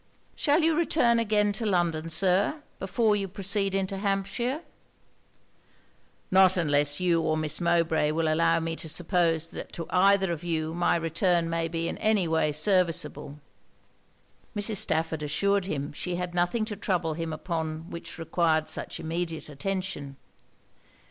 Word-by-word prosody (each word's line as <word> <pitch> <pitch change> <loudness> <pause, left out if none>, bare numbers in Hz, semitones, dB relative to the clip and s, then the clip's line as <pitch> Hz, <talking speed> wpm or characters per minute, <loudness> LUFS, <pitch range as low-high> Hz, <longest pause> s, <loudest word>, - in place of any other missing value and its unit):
'Shall 305 +2 +2
you 325 0 +4
return 305 -8 +3
again 210 -2 +2
to 215 +3 -4
London, 170 -5 0
Sir, 195 - +2 0.2
before 210 +3 +1
you 200 -1 -2
proceed 195 +1 -1
into 195 0 -2
Hampshire?' 200 - -1 1.7
'Not 185 0 +5
unless 145 -3 +2
you 175 -2 +2
or 155 -1 0
Miss 155 +1 -2
Mowbray 165 -3 +2
will 160 +1 0
allow 165 +1 +3
me 165 0 -3
to 160 - -6
suppose 165 -1 +1
that - - -7
to 165 - -5
either 190 0 +4
of 170 0 -4
you 160 -2 -2
my 175 +1 +2
return 170 +1 +1
may 165 0 0
be 165 0 -2
in - - -4
any 215 -5 +2
way 160 -2 +1
serviceable.' 165 -3 0 1.2
Mrs. 205 +1 -1
Stafford 160 -2 -1
assured 195 +6 +1
him 145 -5 -4
she 180 +4 -4
had 180 0 -4
nothing 175 +6 +1
to 215 -1 -5
trouble 175 -6 -1
him 165 0 -4
upon 160 0 -4
which 170 - -7
required 160 -1 +1
such - - -2
immediate 165 -1 -4
attention. 150 -3 -4
175 Hz, 150 wpm, -27 LUFS, 160-195 Hz, 1.7 s, Not